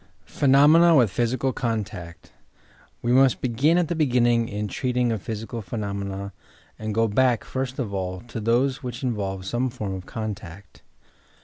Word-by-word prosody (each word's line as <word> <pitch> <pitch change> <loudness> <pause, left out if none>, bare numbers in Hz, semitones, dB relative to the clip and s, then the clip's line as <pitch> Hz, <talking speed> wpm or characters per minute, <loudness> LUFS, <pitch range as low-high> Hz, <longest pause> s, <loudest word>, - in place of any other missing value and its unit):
PHENOMENA 150 +5 +5
WITH 120 -8 +4
PHYSICAL 125 +4 0
CONTACT 105 -7 -4 0.7
We 120 - +1
must 130 0 +4
begin 130 +7 +2
at 175 -2 +2
the 175 - -1
beginning 120 -6 +2
in 105 +1 -3
treating 125 0 0
of 110 -4 -3
physi 110 0 -5
cal 115 -2 -5
phenomena, 100 -1 -5 0.5
and 110 -1 -4
go 115 0 +3
back, 120 +2 +2
first 130 0 -4
of 115 -7 -3
all, 95 -1 -3
to 115 -1 -7
those 125 +5 +1
which 125 -1 -6
involve 100 -6 -2
some 120 +5 -1
form 105 -6 -5
of 95 -1 -7
contact. 100 -4 -7
115 Hz, 155 wpm, -24 LUFS, 100-130 Hz, 0.7 s, PHENOMENA